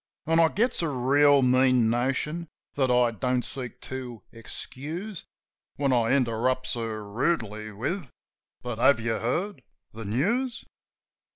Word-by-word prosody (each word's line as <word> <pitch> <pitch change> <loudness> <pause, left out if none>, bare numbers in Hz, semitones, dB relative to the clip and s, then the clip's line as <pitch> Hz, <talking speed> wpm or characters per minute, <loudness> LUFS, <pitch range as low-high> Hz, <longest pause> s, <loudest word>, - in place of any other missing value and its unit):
An' 165 +1 +3
I 165 - +7
gets 225 +8 0
a 165 - 0
reel 140 +1 +4
mean 130 -2 +4
notion 135 +7 -1 0.3
(that 135 -2 +1
I 125 -1 +4
don't 125 +2 -1
seek 125 -3 -7
to 125 -3 -7
excuse). 155 - -7 0.5
When 140 -2 +1
I 120 0 +3
interrupts 130 0 +1
her 110 -3 -4
rudely 110 -3 -1
with, 135 - -3 0.5
"But 120 -2 -4
have 125 +1 +5
you 115 0 -1
heard 165 - -2 0.3
the 110 0 -7
news 220 - 0
130 Hz, 130 wpm, -27 LUFS, 115-150 Hz, 0.5 s, I